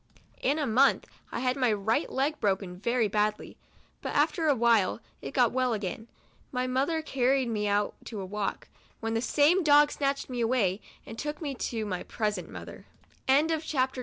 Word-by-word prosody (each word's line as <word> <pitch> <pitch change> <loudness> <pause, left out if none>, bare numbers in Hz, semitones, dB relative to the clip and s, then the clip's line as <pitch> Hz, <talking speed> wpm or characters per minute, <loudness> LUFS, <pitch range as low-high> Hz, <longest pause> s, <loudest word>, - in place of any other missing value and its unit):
In 285 +3 +1
a 300 - 0
month 255 +4 +3 0.3
I 235 - -3
had 255 0 +1
my 255 -4 +2
right 220 +7 0
leg 285 +4 0
broken 190 -3 -1
very 235 +2 +1
badly, 210 +1 -1 0.5
but - - -4
after 325 -3 +2
a 290 - +4
while 230 -4 +3 0.2
it - - -6
got - - +3
well 255 -1 +1
again. 210 +1 -4 0.4
My 250 -1 -1
mother 275 +6 0
carried 265 -2 +1
me 210 -2 -1
out 205 0 +1
to 205 -5 -5
walk, 205 +1 -3 0.3
when 225 0 -2
the 225 - 0
same 310 +8 +3
dog 295 -1 +6
snatched 275 -1 -1
me 245 -2 -3
away, 225 -5 +1 0.2
and 225 - -9
took 295 +1 -4
me 290 -4 -3
to 230 -3 -3
my 185 -3 -3
present 210 -6 -3
mother. - - -10
235 Hz, 170 wpm, -28 LUFS, 210-275 Hz, 0.5 s, dog